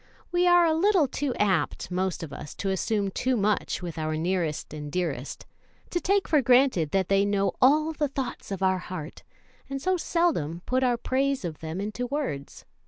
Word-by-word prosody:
We 355 +1 +3
are 350 -1 +6
a 320 - +3
little 355 -2 +3
too 275 0 -2
apt, 185 -5 0
most 185 -1 -1
of 150 -3 -7
us, 145 - -8
to 195 - -2
assume 200 +1 0
too 255 +5 0
much 205 -2 0
with 170 -2 -5
our 155 0 -1
nearest 165 -3 -2
and 150 -1 -6
dearest 150 -7 -3 0.5
to 350 - 0
take 395 +1 +2
for 300 -3 +4
granted 250 - +4
that 190 +2 +1
they 195 0 +3
know 200 -1 +1
all 305 +5 +4
the 300 -1 0
thoughts 270 -1 -5
of 195 -1 -3
our 190 -1 +2
heart, 180 -4 -7 0.5
and 275 0 -3
so 370 +6 +1
seldom 230 - 0
put 255 +1 +1
our 245 -2 +2
praise 270 -1 0
of 160 -3 -5
them 160 +3 -5
into 215 +5 -3
words. 245 - -4
205 Hz, 190 wpm, -27 LUFS, 175-275 Hz, 0.5 s, are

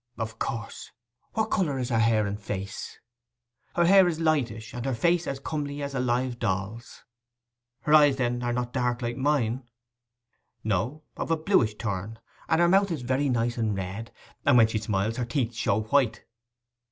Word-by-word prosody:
'Of 110 0 -5
course. 115 -3 -4 0.4
What 220 0 -1
colour 155 -9 +1
is 125 -1 -2
her 115 -2 +2
hair 110 -2 +3
and 100 +1 -3
face?' 100 0 -5 0.8
'Her 175 - +4
hair 190 +1 +7
is 165 -2 -1
lightish, 120 -9 0
and 120 - -5
her 135 -1 -1
face 170 +6 +2
as 135 - -3
comely 145 0 -4
as 140 0 -4
a 135 - -1
live 125 0 0
doll's.' 105 +2 -3 0.8
'Her 150 - +1
eyes, 145 -3 +7
then, 120 -2 -1
are 120 0 -1
not 125 0 -2
dark 125 -1 0
like 120 0 -2
mine?' 130 -3 +1 1.0
'No—of 115 - -3
a 165 - +2
bluish 155 - +2
turn, 105 0 -4 0.3
and 160 - +3
her 175 - +5
mouth 195 +3 +4
is 155 -7 -3
very 130 +3 +1
nice 120 -1 0
and 110 -3 0
red; 95 +4 -5 0.3
and - - +5
when 115 - +8
she 110 0 -1
smiles, 105 +1 -1
her 125 - -1
teeth 120 -1 -1
show 110 -1 +1
white. 115 -1 +1
120 Hz, 175 wpm, -27 LUFS, 110-145 Hz, 1.0 s, when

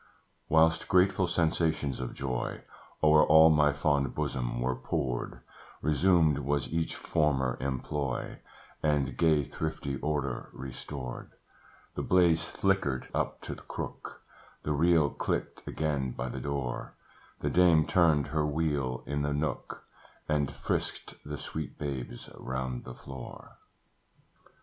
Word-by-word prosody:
Whilst 80 +1 +4
grateful 95 0 +4
sensations 80 -5 0
of 65 - -5
joy 65 -3 -3 0.4
O'er 75 0 +7
all 80 +1 +7
my 75 -1 +4
fond 70 -1 +1
bosom - - -2
were 65 +1 0
poured, 65 -2 -3 0.4
Resumed 80 0 +4
was 70 0 0
each 80 -1 -1
former 65 -4 +1
employ, 70 0 -3 0.4
And 75 -3 +1
gay 80 -3 +3
thrifty 75 -1 -4
order 70 -3 -2
restored: 65 -1 -7 0.6
The - - -3
blaze 85 -3 +4
flickered 95 -10 0
up - - -1
to - - -5
the - - -11
crook, - - -7 0.4
The 75 - -1
reel 80 -1 +4
clicked - - -3
again 70 -5 -1
by 65 +1 -4
the - - -5
door, 70 -4 -3 0.5
The - - 0
dame 85 -3 +5
turned 80 -6 +3
her 75 +1 +1
wheel 75 -5 -1
in 70 +1 -2
the 70 0 0
nook, 75 +2 -3 0.4
And 75 -2 +1
frisked - - -3
the 75 0 -5
sweet 80 +1 -6
babes 70 -4 -5
round 65 -1 -4
the 65 - -8
floor. 65 -2 -10
75 Hz, 125 wpm, -30 LUFS, 65-80 Hz, 0.6 s, O'er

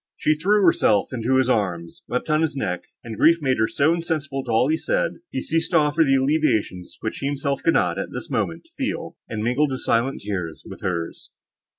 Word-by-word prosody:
She 155 - +2
threw 200 +6 +2
herself 110 - +3
into 125 +2 0
his 130 -1 +3
arms, 90 -8 -1
wept 125 - -2
on 155 0 +2
his 160 -3 0
neck, 90 -10 -3 0.2
and 115 -2 -7
grief 165 +1 +6
made 130 -5 0
her 110 - +3
so 150 +7 +2
insensible 155 -5 -2
to - - -9
all 115 +3 +3
he 155 - +2
said, - - 0
that - - -19
he 130 - -4
ceased 165 +1 0
to - - +3
offer 150 +1 +3
the 135 -3 +3
alleviations, 130 - 0
which 110 - -4
he 140 - -2
himself 140 0 -2
could 165 - +2
not, - - +1
at - - -3
this - - -6
moment, - - -2
feel, 270 -2 -3
and 110 -1 -3
mingled 130 +6 +2
his 130 - -4
silent 120 +4 +1
tears 90 -6 -4
with - - -10
hers. 85 -2 -4
135 Hz, 220 wpm, -23 LUFS, 110-155 Hz, 0.2 s, grief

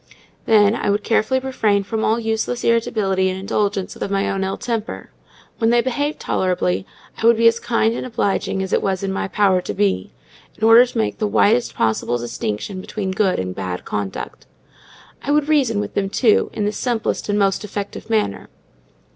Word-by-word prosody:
Then, 210 -2 +5
I - - -1
would 205 +1 +1
carefully 235 +3 +1
refrain 220 -6 0
from 220 +3 -3
all 225 +2 +2
useless 225 +2 -2
irritability 200 -5 +1
and 185 0 -4
indulgence 200 0 -1
of - - -4
my 195 0 0
own 195 0 -1
ill 190 0 -2
temper: 230 -3 -4 0.5
when 225 -1 +3
they 240 0 +4
behaved 285 +5 -2
tolerably, 95 - -1 0.3
I 225 - +4
would 235 -1 +6
be 230 0 +5
as 230 0 +3
kind 230 -1 +1
and - - -4
obliging 200 -5 -1
as 190 - -4
it - - +3
was 190 -1 -1
in 195 - -1
my 195 - -2
power 190 -1 +2
to 100 - -5
be, 95 -2 0 0.5
in - - -9
order 230 +3 +7
to 245 - -7
make 220 - -1
the 215 - +1
widest 230 +3 +2
possible 115 +2 0
distinction 120 - -4
between 195 -1 -4
good 190 -1 +1
and 90 0 -3
bad 95 -1 -5
conduct; 100 -2 -5 0.7
I - - -6
would 295 0 +2
reason 265 -9 +2
with 205 - -4
them, 195 -1 -1
too, 220 +1 +3
in 210 - -2
the 210 - +1
simplest 225 -1 -2
and 205 - +1
most 195 -1 +1
effective 205 +1 -6
manner. 215 - -1
205 Hz, 190 wpm, -20 LUFS, 190-230 Hz, 0.7 s, order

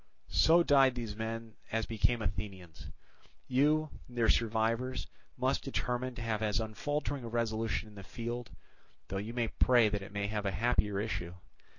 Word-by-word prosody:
"So 160 - +6
died 135 -4 +5
these 115 -4 -4
men 115 0 -4 0.2
as 115 0 0
became 115 +1 +1
Athenians. 95 -2 -5 0.6
You, 150 +4 +3 0.2
their 120 -2 +1
survivors, 115 +3 +1 0.3
must 130 +2 +1
determine 125 -2 -2
to 115 - -5
have 110 -2 -1
as 110 +1 +1
unfaltering 140 +5 -2
a - - -5
resolution 115 -1 -1
in 105 - -14
the 100 -1 -9
field, 120 +3 -5 0.6
though 95 - -2
you 110 +4 -4
may 120 -2 0
pray 120 -4 +4
that 105 -1 -2
it 100 +2 -9
may 100 0 -2
have 105 0 -2
a - - +1
happier 105 -2 +1
issue. 90 -5 -3
115 Hz, 165 wpm, -32 LUFS, 105-125 Hz, 0.6 s, So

